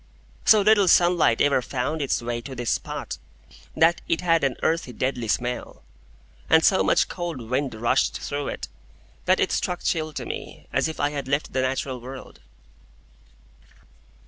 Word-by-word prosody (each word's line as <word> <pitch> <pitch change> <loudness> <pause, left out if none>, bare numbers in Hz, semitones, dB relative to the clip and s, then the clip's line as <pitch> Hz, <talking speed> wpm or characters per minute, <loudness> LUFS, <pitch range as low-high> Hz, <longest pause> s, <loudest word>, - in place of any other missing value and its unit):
So 215 -1 +7
little 205 -1 +4
sunlight 175 -9 +4
ever 140 -2 +3
found 135 +5 -3
its 135 -3 -1
way 120 0 -3
to 130 +2 -8
this 120 -1 -2
spot, - - -4 0.6
that 165 +2 +3
it 165 - 0
had 165 -3 +2
an 135 -3 +1
earthy, 160 -6 0
deadly 125 -1 -2
smell; 125 +3 -3 0.7
and 160 - +5
so 190 - +4
much - - +3
cold 175 -5 -5
wind 130 -2 -1
rushed 120 +4 +1
through 145 0 -4
it, - - -5 0.6
that - - +3
it - - +1
struck 180 -1 -2
chill 155 -2 0
to - - -5
me, - - -7
as - - +2
if 160 - -6
I 145 0 +1
had 140 -3 -5
left 140 +2 -1
the 130 - +1
natural 130 -1 -2
world. 130 +2 -10
140 Hz, 165 wpm, -24 LUFS, 125-165 Hz, 0.7 s, So